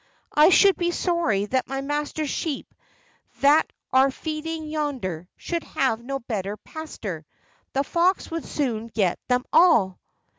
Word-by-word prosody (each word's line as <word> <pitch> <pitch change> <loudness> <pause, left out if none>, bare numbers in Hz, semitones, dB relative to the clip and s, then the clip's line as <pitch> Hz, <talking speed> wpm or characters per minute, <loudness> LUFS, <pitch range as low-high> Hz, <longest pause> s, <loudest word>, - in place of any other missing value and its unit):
I 300 +3 +7
should 390 +1 +6
be 345 -1 0
sorry 340 - 0
that 255 +4 -1
my 270 +1 -3
master's 295 +1 -2
sheep, 300 -5 -3 0.7
that 290 +3 +5 0.2
are 265 +1 +6
feeding 315 +3 -4
yonder, 255 - -3
should 340 -1 -3
have 235 -3 -1
no 275 +2 -3
better 210 -5 -4
pastor 210 - -7 0.5
the 275 - +1
fox 350 +5 +1
would 330 -1 -4
soon 230 -6 -2
get 205 -6 0
them 250 0 +1
all." 230 - +5
275 Hz, 140 wpm, -24 LUFS, 225-315 Hz, 0.7 s, I